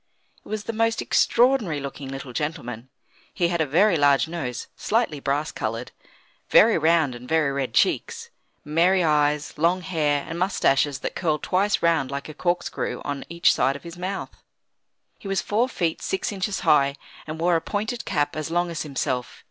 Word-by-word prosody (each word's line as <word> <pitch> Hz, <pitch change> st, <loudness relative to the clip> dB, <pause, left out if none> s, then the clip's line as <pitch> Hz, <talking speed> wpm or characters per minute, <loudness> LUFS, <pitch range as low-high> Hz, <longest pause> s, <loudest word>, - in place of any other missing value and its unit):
It -, -, -15 dB
was 215 Hz, -1 st, -3 dB
the 230 Hz, -, -4 dB
most 225 Hz, +1 st, +1 dB
extraordinary 235 Hz, -, +2 dB
looking 140 Hz, 0 st, -7 dB
little 135 Hz, -2 st, -7 dB
gentleman. 130 Hz, -5 st, -4 dB, 0.5 s
He 175 Hz, -3 st, +1 dB
had 170 Hz, -1 st, 0 dB
a 155 Hz, -, +1 dB
very 180 Hz, +6 st, +4 dB
large 145 Hz, +1 st, +4 dB
nose, 135 Hz, -8 st, -4 dB
slightly 220 Hz, -10 st, 0 dB
brass 145 Hz, +3 st, -1 dB
coloured; 115 Hz, 0 st, -4 dB, 0.6 s
very 225 Hz, 0 st, +6 dB
round 160 Hz, -3 st, +3 dB
and 120 Hz, +1 st, -10 dB
very 160 Hz, -3 st, +2 dB
red 135 Hz, -2 st, -3 dB
cheeks; 465 Hz, 0 st, +1 dB, 0.3 s
merry 175 Hz, +5 st, +3 dB
eyes, 150 Hz, -1 st, +1 dB
long 175 Hz, +3 st, +2 dB
hair, 150 Hz, -6 st, 0 dB
and 165 Hz, +1 st, -5 dB
moustaches 145 Hz, -7 st, +2 dB
that -, -, -3 dB
curled 155 Hz, -4 st, -1 dB
twice 200 Hz, +3 st, +1 dB
round 165 Hz, -6 st, +2 dB
like 140 Hz, 0 st, -5 dB
a 155 Hz, -, -8 dB
corkscrew 175 Hz, +3 st, -2 dB
on 145 Hz, -1 st, -4 dB
each 170 Hz, 0 st, +3 dB
side 135 Hz, -, +1 dB
of 145 Hz, -, -9 dB
his 170 Hz, -1 st, -9 dB
mouth. 185 Hz, +2 st, -4 dB, 0.9 s
He -, -, -9 dB
was 195 Hz, -1 st, 0 dB
four 225 Hz, +7 st, 0 dB
feet 170 Hz, -9 st, -2 dB
six 190 Hz, -, -2 dB
inches 195 Hz, 0 st, -2 dB
high, 140 Hz, -2 st, +3 dB, 0.3 s
and 155 Hz, +1 st, -6 dB
wore 175 Hz, +1 st, +3 dB
a 165 Hz, -, +1 dB
pointed 220 Hz, +5 st, -3 dB
cap 145 Hz, -4 st, -1 dB
as 155 Hz, 0 st, -3 dB
long 175 Hz, +1 st, 0 dB
as 165 Hz, -, -4 dB
himself. 130 Hz, -4 st, -3 dB
160 Hz, 180 wpm, -24 LUFS, 145-185 Hz, 0.9 s, very